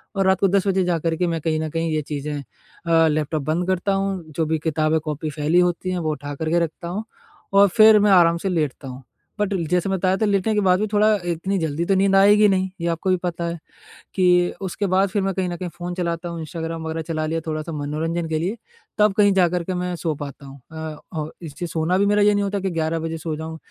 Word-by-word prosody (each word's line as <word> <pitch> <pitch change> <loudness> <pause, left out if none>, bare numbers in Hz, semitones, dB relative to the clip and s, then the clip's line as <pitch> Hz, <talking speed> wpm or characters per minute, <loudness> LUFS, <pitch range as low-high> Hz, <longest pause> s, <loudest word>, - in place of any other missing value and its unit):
और 195 -1 +1
रात 190 -1 +3
को 195 - +5
10 200 +1 +1
बजे 190 -1 +2
जाकर 165 -2 0
के 180 +1 +1
मैं 165 -1 -2
कहीं 155 0 0
न 160 - -3
कहीं 165 +1 -2
ये 155 -1 0
चीज़ें 145 +1 -3
अ, 165 +4 -1
लैपटॉप 150 -1 -1
बंद 165 +4 -1
करता 190 +1 0
हूँ, 195 -2 -1
जो 160 +2 -1
भी 160 0 -1
किताबें-कॉपी 155 0 -1
फैली 150 +3 +1
होती 180 +1 0
है, 180 - -1
वो 155 -2 -1
उठाकर 145 +2 -5
के 175 - +3
रखता 165 +2 -9
हूँ 200 +5 -3 0.5
और 200 0 +7
फिर 215 -1 +8
मैं 205 0 +4
आराम 170 -3 +5
से 190 +3 -3
लेटता 150 -6 -2
हूँ। 130 +1 -9 0.4
बट 205 -1 0
ल 175 -4 -1
जैसे 180 +3 0
मैं 190 - 0
बताया 185 +1 +1
था 215 - +1
लेटने 205 +1 +1
के 210 - +2
बाद 185 -1 +3
भी 215 - 0
थोड़ा 210 +1 +4 0.2
इतनी 175 +4 -1
जल्दी 160 0 -2
तो 195 - +2
नींद 195 0 +3
आएगी 205 +2 +6
नहीं, 190 0 +1
ये 170 - -1
आपको 165 +3 -2
भी 185 - +3
पता 170 -1 -3
है, 170 0 -4 0.6
कि 180 -1 +3
उसके 195 +1 -2
बाद 190 +2 +2
फिर 205 +1 -1
मैं 195 0 0
कहीं 185 -2 -1
न 175 - -4
कहीं 180 -1 -5
फ़ोन 175 0 -5
चलाता 175 -1 -3
हूँ, 170 -1 -6
इंस्टाग्राम 165 +1 -5
वगैरह 160 0 -3
चला 155 -1 -2
लिया 165 +1 -2
थोड़ा-सा 155 +1 -3
मनोरंजन 160 +3 -2
के 160 -1 0
लिए, 190 +8 -2 0.4
तब 210 -1 +4
कहीं 205 -1 +5
जाकर 180 -2 +2
के 185 - -3
मैं 180 0 -2
सो 165 -2 -2
पाता 140 -1 -8
हूँ 135 +1 -12
अ, 160 -1 -6 0.2
और 155 -1 -4
इससे 165 +1 -6
सोना 165 +2 0
भी 200 - +3
मेरा 205 0 +3
ये 210 0 +5
नहीं 205 - +1
होता 200 0 -1
कि 190 0 -2
11 165 0 -1
बजे 165 0 -4
सो 160 0 -4
जाऊँ, 160 0 -6
170 Hz, 250 wpm, -22 LUFS, 160-190 Hz, 0.6 s, फिर